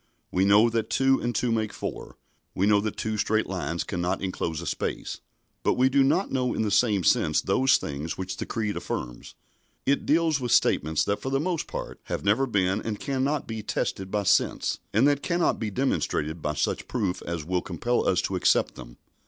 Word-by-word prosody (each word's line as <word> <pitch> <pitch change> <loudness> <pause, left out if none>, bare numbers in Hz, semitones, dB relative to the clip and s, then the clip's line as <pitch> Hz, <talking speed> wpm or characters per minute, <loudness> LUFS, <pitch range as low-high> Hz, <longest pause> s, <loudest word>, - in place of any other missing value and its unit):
We 95 +1 +2
know 105 +3 +6
that 115 -1 -1
two 135 0 +3
and 120 0 -2
two 125 - +1
make 110 -2 0
four, - - -6 0.4
we 95 - +2
know 105 -1 +4
that 110 0 -3
two 110 -1 -2
straight 110 +1 +1
lines 85 -3 -3
cannot 90 -2 -2
enclose 85 -4 -3
a 85 - -6
space; - - -3 0.4
but - - +2
we 130 +1 +4
do 135 +1 +4
not 175 +8 +1
know 125 -2 0
in - - 0
the 105 - -1
same 105 -2 +3
sense 75 -1 +3
those 130 +8 +3
things 75 +3 -5
which 95 0 -4
the - - -5
Creed 110 -3 -2
affirms. - - -5 0.5
It 140 +1 +1
deals 160 -1 +3
with 125 -2 -3
statements 80 +2 +3
that, 100 - -1
for 130 - -3
the 135 0 +1
most 170 +1 -2
part, - - -6
have - - -4
never 115 +7 +3
been, 100 -2 +1
and 110 -2 -4
cannot 140 +1 -1
be, 110 -1 -4
tested 95 -2 -3
by 105 +1 -1
sense, - - +1
and 115 +7 +4
that 145 -1 +2
cannot 170 -1 +1
be 110 - -2
demonstrated 85 - -1
by 75 0 -2
such - - -1
proof 100 -8 -2
as 85 -3 -3
will 90 +1 0
compel 120 +9 -1
us 90 0 +2
to 95 - -2
accept 90 - +2
them. - - -12
105 Hz, 205 wpm, -26 LUFS, 90-130 Hz, 0.5 s, know